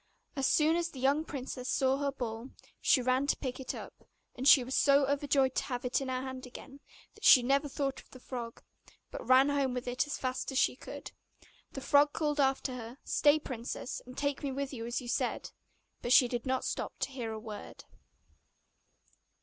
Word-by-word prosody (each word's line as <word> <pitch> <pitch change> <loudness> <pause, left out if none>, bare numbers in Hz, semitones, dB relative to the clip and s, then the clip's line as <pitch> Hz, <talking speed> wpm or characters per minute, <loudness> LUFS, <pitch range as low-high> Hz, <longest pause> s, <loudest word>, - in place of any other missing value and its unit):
As 270 -1 +1
soon 310 +3 +3
as 340 0 -1
the 270 - -10
young 280 +4 +2
princess 260 -4 -6
saw 265 0 +2
her 280 0 -1
ball, 235 -1 -5 0.3
she 255 - +4
ran 255 +2 +1
to - - +1
pick 255 -1 -5
it 260 - -5
up; - - -8 0.4
and 260 +2 -2
she 270 -3 +8
was 255 +2 -6
so 280 0 +5
overjoyed 280 -1 +1
to - - -1
have 245 -1 -4
it 250 +2 0
in 270 - -4
her 255 0 -2
hand 260 -1 -7
again, 270 +2 -11 0.3
that - - -19
she 250 - +8
never 275 +3 +1
thought 275 -1 -2
of - - -26
the 255 - -13
frog, 240 -2 -7 0.5
but - - -6
ran 260 +2 +6
home 275 -3 0
with 250 - -4
it 250 +4 0
as 290 - -3
fast 255 +1 -3
as 265 - -2
she - - +3
could. - - -9 0.6
The 270 - -6
frog 290 +2 +4
called 295 -2 -1
after 270 -1 +1
her, 240 0 -8
'Stay, 295 +1 +4
princess, 250 -4 -5
and 255 - -11
take 285 -1 -1
me 280 - -2
with 275 +1 -4
you 230 -2 -5
as 240 +3 -2
you 245 - -9
said,' - - -2 0.5
But 240 - +1
she 250 - +7
did 240 +1 -4
not 260 0 0
stop - - -4
to - - -1
hear 240 -4 -4
a 220 - -5
word. 215 -2 -9
265 Hz, 210 wpm, -31 LUFS, 250-280 Hz, 0.6 s, she